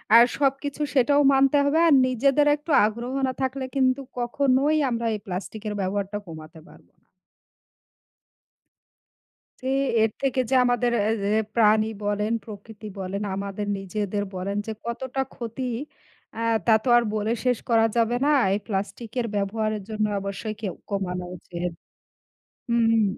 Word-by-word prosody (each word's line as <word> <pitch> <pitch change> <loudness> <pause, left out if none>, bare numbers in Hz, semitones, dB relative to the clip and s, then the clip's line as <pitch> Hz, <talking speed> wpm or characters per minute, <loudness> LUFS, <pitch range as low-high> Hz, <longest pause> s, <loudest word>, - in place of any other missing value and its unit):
আর 235 - +10
সবকিছু 285 +1 -1
সেটাও 285 +2 +4
মানতে 270 +1 +4
হবে। 290 +3 +2
আর 320 - +6
নিজেদের 275 +4 +2
একটু 300 +2 -7
আগ্রহ 235 +4 -3
না 260 - -2
থাকলে 265 0 -2
কিন্তু 260 0 +2 0.2
কখনোই 270 +4 +2
আমরা 235 -1 -2
এই - - -5
প্লাস্টিকের 210 +3 -5
ব্যবহারটা 200 +1 -2
কমাতে 160 -1 -10
পার - - -16 2.9
জি, - - -1 0.3
এর 220 - +3
থেকে 265 -1 +1
যে - - +2
আমাদের 245 -1 +1
অ্যা 210 +2 +1 0.3
এ - - 0
প্রাণী 215 -1 +4 0.2
বলেন, 205 +2 0
প্রকৃতি 215 0 -10
বলেন, 195 +2 -4
আমাদের 200 +1 -4
নিজেদের 205 +1 -3
বলেন 190 +2 -3
যে 220 - -3
কতটা 260 +3 -3
ক্ষতি 235 +2 -6 0.7
অ্যা 225 - -4 0.2
তা 230 - +5
তো - - -1
আর 240 - +5
বলে 215 +1 0
শেষ 250 -3 +2
করা 225 -1 +4
যাবে 235 +1 +2
না। 295 - +3 0.2
এই 200 - +1
প্লাস্টিকের 215 +4 -3
ব্যবহারের 215 +1 -1
জন্য 215 -1 -1 0.2
অবশ্যই 200 +2 -4
কেও 195 -6 -3 0.2
কমানো 180 -3 -2
উচিত। 175 0 -5 1.0
হুম। 225 -1 +3
225 Hz, 140 wpm, -25 LUFS, 205-255 Hz, 2.9 s, আর